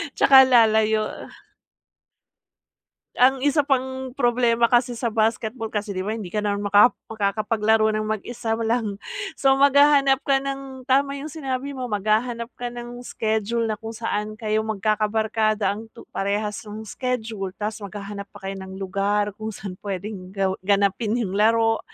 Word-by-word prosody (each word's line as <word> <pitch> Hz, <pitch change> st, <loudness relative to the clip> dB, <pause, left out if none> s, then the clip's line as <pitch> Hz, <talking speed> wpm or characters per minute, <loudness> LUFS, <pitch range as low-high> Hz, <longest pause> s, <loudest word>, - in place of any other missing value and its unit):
Tsaka, 265 Hz, -1 st, +8 dB
lalayo. 220 Hz, -3 st, +3 dB, 1.9 s
Ang 260 Hz, +2 st, +4 dB
isa 290 Hz, +2 st, +2 dB
pang 260 Hz, -1 st, -1 dB
problema 240 Hz, -2 st, +2 dB
kasi 245 Hz, +1 st, +3 dB
sa 235 Hz, +1 st, -2 dB
basketball 225 Hz, +1 st, -1 dB
kasi, 205 Hz, -1 st, -3 dB
'di 185 Hz, -, -2 dB
ba, 205 Hz, -, -2 dB
hindi 220 Hz, -4 st, -4 dB
ka 210 Hz, +4 st, -3 dB
naman 205 Hz, 0 st, -1 dB
maka 205 Hz, +5 st, +6 dB, 0.2 s
makakapaglaro 215 Hz, +1 st, +1 dB
ng 215 Hz, -, -1 dB
mag-isa 225 Hz, +2 st, -3 dB
mo 225 Hz, -, -1 dB
lang. 220 Hz, -4 st, -1 dB, 0.4 s
So, 270 Hz, 0 st, +4 dB
maghahanap 280 Hz, -1 st, +5 dB
ka 270 Hz, -1 st, +3 dB
ng 270 Hz, -1 st, -6 dB
tama 275 Hz, +2 st, +2 dB
yung 300 Hz, +2 st, -7 dB
sinabi 275 Hz, -3 st, -4 dB
mo, 260 Hz, -2 st, -5 dB
maghahanap 225 Hz, +3 st, -1 dB
ka 245 Hz, -, -3 dB
ng 240 Hz, 0 st, -8 dB
schedule, 220 Hz, +1 st, -1 dB
na 215 Hz, -, -3 dB
kung 225 Hz, 0 st, -7 dB
saan, 215 Hz, -1 st, -3 dB
kayo 215 Hz, -1 st, -1 dB
magkakabarkada 215 Hz, 0 st, 0 dB
ang 215 Hz, +3 st, -7 dB
tu 230 Hz, -, -11 dB
parehas 205 Hz, +1 st, -1 dB
yung 215 Hz, +1 st, -7 dB
schedule, 220 Hz, -5 st, -4 dB
tas 215 Hz, +1 st, -4 dB
maghahanap 200 Hz, 0 st, -7 dB
pa 195 Hz, -, -8 dB
kayo 195 Hz, -, -5 dB
ng 190 Hz, 0 st, -8 dB
lugar 200 Hz, +2 st, 0 dB
kung 215 Hz, +2 st, -6 dB
saan 195 Hz, -1 st, -7 dB
puwedeng 195 Hz, -1 st, -6 dB
ga 195 Hz, -1 st, +1 dB
ganapin 200 Hz, +3 st, +1 dB
yung 210 Hz, -6 st, -2 dB
laro, 225 Hz, +2 st, +3 dB
220 Hz, 155 wpm, -23 LUFS, 205-245 Hz, 1.9 s, Tsaka